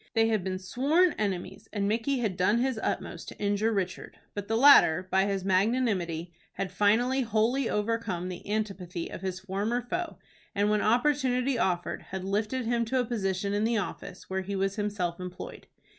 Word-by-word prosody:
They 225 0 +4
had 215 -4 +1
been 185 0 -2
sworn 285 - +2
enemies, 195 -2 -3
and 200 -2 -1
Micky 230 +6 0
had 210 -6 -1
done 185 +5 +3
his 250 -1 0
utmost - - -3
to - - -9
injure 205 +2 +1
Richard, 190 -4 -3 0.2
but 205 -1 -5
the 225 - +1
latter, 190 - +7
by 190 0 +4
his 195 -2 -2
magnanimity, 185 -5 +1 0.2
had 190 -2 -3
finally 230 +7 +3
wholly 230 +3 +1
overcome 210 -4 -1
the 185 +2 -7
antipathy 190 -5 -3
of - - -7
his 190 -1 -4
former 200 +5 -1
foe, 350 +7 -3 0.4
and, 205 +1 +2
when 210 -1 +2
opportunity 255 +1 +2
offered, 180 -4 0
had 190 0 -5
lifted 215 +6 -1
him 235 0 +1
to 255 +3 0
a 250 - +1
position 200 -3 -1
in 205 +1 +1
the 230 +1 +2
office 195 -1 -5
where 190 0 -2
he 200 +2 -4
was 195 +1 0
himself 200 -5 -2
employed. 180 0 -8
205 Hz, 180 wpm, -28 LUFS, 190-235 Hz, 0.4 s, latter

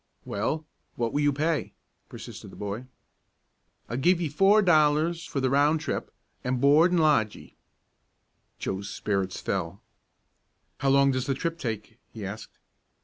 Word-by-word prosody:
"Well, 135 +10 -2 0.3
what 115 -1 -2
will 145 - +1
you 145 0 +3
pay?" 155 +2 -1 0.4
persisted - - -9
the - - -13
boy. 105 +4 -5 1.0
"I'll 120 - -3
give 175 +6 +3
ye 165 -3 -1
four 195 +8 +4
dollars 160 0 +3
for 140 - -3
the 130 -1 +1
round 145 +3 +3
trip, 155 - -4 0.3
an' 125 +1 0
board 150 +7 +5
an' 180 - +2
lodge 150 -10 +3
ye." - - -15 1.0
Joe's 100 +1 -4
spirits 95 -1 -2
fell. - - -3 1.0
"How 135 - +1
long 140 0 +5
does 130 0 -2
the 135 - +1
trip 165 +4 -3
take?" 110 -2 -5
he 110 -3 -6
asked. 105 +3 -8
140 Hz, 150 wpm, -27 LUFS, 115-160 Hz, 1.0 s, board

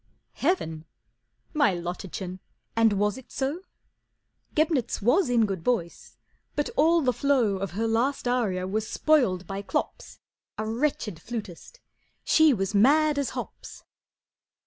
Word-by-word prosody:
"Heaven! 165 - -1 0.7
My 285 - +3
Lottachen, 180 +1 -5 0.4
and 225 -2 +4
was 205 +3 0
it 260 - -17
so? 280 +6 -2 0.9
Gebnitz 305 -5 +1
was 250 - +3
in 235 -2 +3
good 190 -5 -4
voice, 175 -8 -2 0.4
but 295 - -1
all 330 +3 +4
the 255 -3 +2
flow 255 -9 +2
Of 195 -1 -4
her 225 +4 -1
last 245 +4 0
aria 210 -7 0
was 215 +3 -2
spoiled 240 - +2
by 195 +3 -5
Klops, 200 - -4 0.4
A 215 - -2
wretched 225 - -2
flutist, 225 - -7 0.4
she 315 -1 +5
was 195 -4 -1
mad 290 +7 +4
as 280 - -1
hops." - - -8
225 Hz, 130 wpm, -26 LUFS, 195-280 Hz, 0.9 s, she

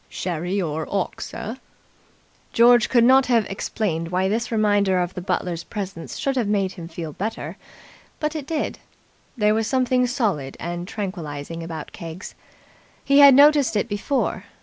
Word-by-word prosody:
"Sherry 180 +2 -3
or 160 -3 -2
'ock, 195 -2 -2
sir?" 225 +4 -6 1.0
George 240 0 +5
could 235 -2 +4
not 260 +2 +5
have 235 -4 +3
explained 180 -4 -3
why 185 +2 +1
this 225 +4 -1
reminder 205 -4 +2
of 175 +1 -2
the 180 - -6
butler's 180 -2 -2
presence 195 -5 -6
should 275 -1 -1
have 240 -5 0
made 200 -2 +1
him 170 -4 -9
feel 165 -2 -7
better, 215 +7 -4 0.6
but 300 +1 -2
it 295 -3 -5
did. 315 -2 -2 0.6
There 210 -1 +3
was 220 0 0
something 255 -1 +2
solid 200 - -2
and 175 +1 -5
tranquilizing 165 -7 -5
about 165 -2 -7
Keggs. 165 +3 -8 0.7
He 280 +1 +5
had 280 -2 +9
noticed 285 -3 +5
it 205 - +1
before. 210 +7 -2
205 Hz, 155 wpm, -23 LUFS, 175-240 Hz, 1.0 s, had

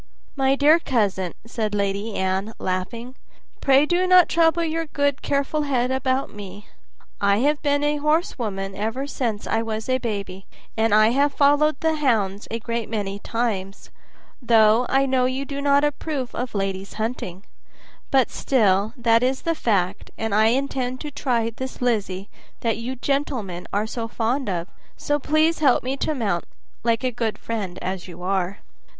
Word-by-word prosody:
"My 270 -1 +2
dear 300 +4 +5
cousin," 200 - 0
said 220 -2 -2
Lady 200 +2 -1
Anne, 190 +3 -1
laughing, 230 +7 -3 0.5
"pray 275 +1 +5
do 355 +3 +1
not 365 -1 +7
trouble 335 0 +3
your 325 0 -2
good 285 -1 0
careful 280 +2 0
head 260 -3 0
about 260 0 0
me. 205 0 -9 0.6
I 200 0 +4
have 290 +2 +2
been 285 -1 +1
a 295 0 +1
horsewoman 240 - -1
ever 225 +7 -2
since 235 -7 -3
I 225 - 0
was 220 -1 -4
a 255 0 +1
baby, 200 -5 -5 0.3
and 225 0 +1
I 215 +1 +6
have 280 +3 +2
followed 290 +1 +3
the 320 -1 +1
hounds 215 -8 0
a 230 - -2
great 230 -1 -4
many 200 -3 -3
times, 205 -4 -3 0.5
though 230 0 +4
I 270 +1 +3
know 260 -1 +2
you 260 +2 -1
do 280 0 -5
not 280 0 +4
approve 295 -3 -2
of 245 -2 -4
ladies 195 -1 -3
hunting; 215 -5 -4 0.7
but 265 -3 +3
still 210 -5 +2
that 230 -1 +3
is 260 +1 0
the 335 - +1
fact, 200 - 0
and 225 -2 -2
I 215 +1 +5
intend 255 0 -1
to 295 - -5
try 240 -5 0
this 260 +3 -7
Lizzie 205 -6 -1 0.3
that 225 -3 0
you 240 +3 -4
gentlemen 250 - -2
are 205 - +1
all - - -2
so 230 0 -4
fond 230 +2 -1
of; 175 -2 -2 0.3
so 290 0 0
please 310 +3 +2
help 275 -5 +4
me 260 +2 -1
to 310 - -1
mount, 200 -9 -1 0.4
like 230 +1 +1
a 255 - +1
good 230 -2 -2
friend 205 -6 -4
as 185 0 -4
you 180 0 -10
are." 190 0 -1
235 Hz, 170 wpm, -23 LUFS, 205-275 Hz, 0.7 s, not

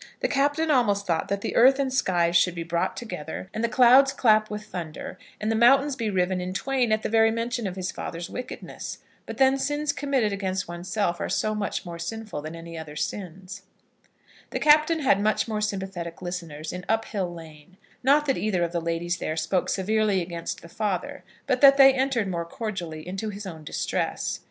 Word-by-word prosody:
The - - +2
Captain 290 +3 +1
almost 205 -7 +2
thought 165 -3 0
that 200 0 -2
the - - -3
earth 265 +3 +6
and 270 -2 -1
skies 175 -8 +1
should 175 +1 +4
be 170 - -3
brought 170 +1 -1
together, 185 -4 -6
and 220 - -3
the 235 - +2
clouds 255 +4 +6
clap 215 -5 +3
with 210 0 -5
thunder, 170 -5 -7 0.2
and 215 +1 -1
the - - +1
mountains 270 +5 +5
be 230 -4 -2
riven 185 -1 0
in 180 +1 -4
twain 255 0 0
at 215 0 +1
the - - 0
very 225 0 +4
mention 230 0 -2
of 185 - -5
his 185 -1 -3
father's 170 +1 -6
wickedness. 250 0 -7 0.3
But - - -6
then 270 0 +4
sins 290 +1 0
committed 270 -8 0
against 190 -1 -2
oneself 175 +1 -2
are - - -3
so 215 - 0
much 210 -2 -3
more 170 -1 -7
sinful 215 -1 -5
than 155 +2 -7
any 165 0 -8
other 150 -2 -9
sins. 185 +3 -5 0.9
The - - -3
Captain 310 +2 +4
had 200 -8 +3
much 215 +2 +1
more 215 -1 -2
sympathetic 190 -5 -4
listeners 170 -4 -6
in 180 0 -6
Uphill 215 -5 -1
Lane; 165 +1 -13 0.2
not 285 +3 +4
that 270 -2 0
either 195 -5 0
of 170 - -1
the 170 -1 -2
ladies 170 +1 -2
there 155 - -3
spoke 165 +3 0
severely 210 0 +1
against 170 -1 -5
his 170 - -14
father, 215 +6 -3 0.2
but 255 -2 0
that 275 -1 +8
they 270 -1 +8
entered 260 -5 0
more 170 -2 -2
cordially 175 -5 -5
into 195 +4 -4
his 205 0 -7
own 160 -4 -8
distresses. - - -2
200 Hz, 200 wpm, -25 LUFS, 175-245 Hz, 0.9 s, that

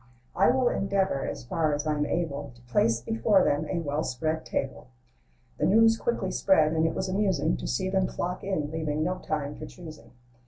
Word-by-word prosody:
I 195 - +4
will 255 0 +3
endeavor, 195 - 0
as - - -5
far 155 +3 0
as 145 - -4
I'm 150 -1 0
able, 145 -6 -3
To 120 - -19
place 115 -1 +2
before 125 - +2
them 145 +2 +1
a 185 - -1
well 150 0 -2
spread 155 +6 -2
table." 135 -1 -3 0.7
The - - +2
news 225 +3 +5
quickly 225 -5 -2
spread, 160 -6 +3
and 160 0 +2
it 165 - -3
was 190 - -2
amusing 185 -5 +1
To - - -5
see 125 +10 -1
them 190 0 +1
flock 180 +1 -4
in, 155 -7 -2
leaving 155 -1 -1
no 180 +3 -1
time 150 -2 -3
for - - -8
choosing. 155 -10 -12
160 Hz, 195 wpm, -27 LUFS, 145-190 Hz, 0.7 s, news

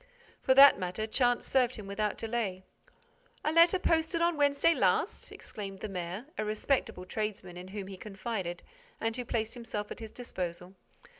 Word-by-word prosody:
For 260 - +3
that 275 -5 +9
matter, 185 +4 -2
chance 245 +2 +1
served 255 -2 +2
him 215 - -8
without 205 +1 -2
delay: 220 -5 -2 0.8
"A 305 - +2
letter 335 +3 +6
posted 330 -1 +1
on 340 0 +2
Wednesday 290 +3 +3
last?" - - +1
exclaimed 195 -2 -8
the - - -3
mayor, 185 +4 -5
a - - +1
respectable 215 -2 -1
tradesman 205 -3 -4
in 180 +1 -8
whom 200 0 -6
he 190 0 -8
confided 195 -3 -5 0.4
and 225 0 -1
who 250 - -3
placed 225 -2 -2
himself 225 -4 -5
at - - -6
his 220 -1 -8
disposal. 180 -6 -5
215 Hz, 165 wpm, -31 LUFS, 195-255 Hz, 0.8 s, that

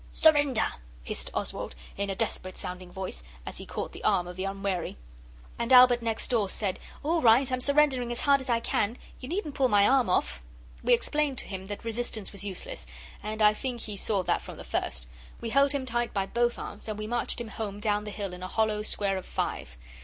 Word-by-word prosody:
'Surrender!' 290 -7 +4 0.3
hissed - - -3
Oswald, - - -3 0.2
in 200 0 -2
a 195 - -1
desperate 185 0 -2
sounding 180 0 -6
voice, 190 - -4 0.2
as - - -5
he - - -8
caught - - -4
the - - -10
arm 175 - +3
of 180 - -7
the 185 +1 -3
Unwary. 195 - -2 0.6
And 235 +1 -1
Albert 250 -1 +8
next 225 -1 -1
door 220 -5 +2
said, 195 -2 -1 0.2
'All 325 +3 +2
right! 245 +3 +5
I'm 255 0 0
surrendering 280 -4 +3
as 240 - -2
hard 280 -1 +4
as 260 - -7
I 230 -1 +2
can. 225 +1 0 0.2
You 255 - -7
needn't 335 -4 -2
pull 270 -1 +3
my 205 -3 +5
arm 265 -2 +4
off.' - - +1 0.4
We - - +5
explained 300 - 0
to - - -3
him 190 -1 -6
that 205 +3 -6
resistance 230 -2 -2
was 200 -1 -4
useless, 190 - -4 0.3
and 215 +1 -2
I 210 0 +7
think 245 +1 -4
he 210 - -5
saw 195 -1 +1
that - - +1
from - - -9
the - - -8
first. - - -2 0.3
We 230 - -4
held 275 +2 +5
him 280 -2 -1
tight 240 -2 -1
by 195 -1 +1
both 240 +3 +1
arms, - - -7
and 215 -1 -3
we 215 - -4
marched 240 +2 -1
him 235 -2 -5
home 205 -2 -5
down 210 -1 +1
the 210 - -6
hill 200 -3 -4
in 180 - -8
a 185 - -4
hollow 215 +1 +1
square 200 -2 0
of 190 - -6
five. - - -3
220 Hz, 220 wpm, -29 LUFS, 200-255 Hz, 0.6 s, Albert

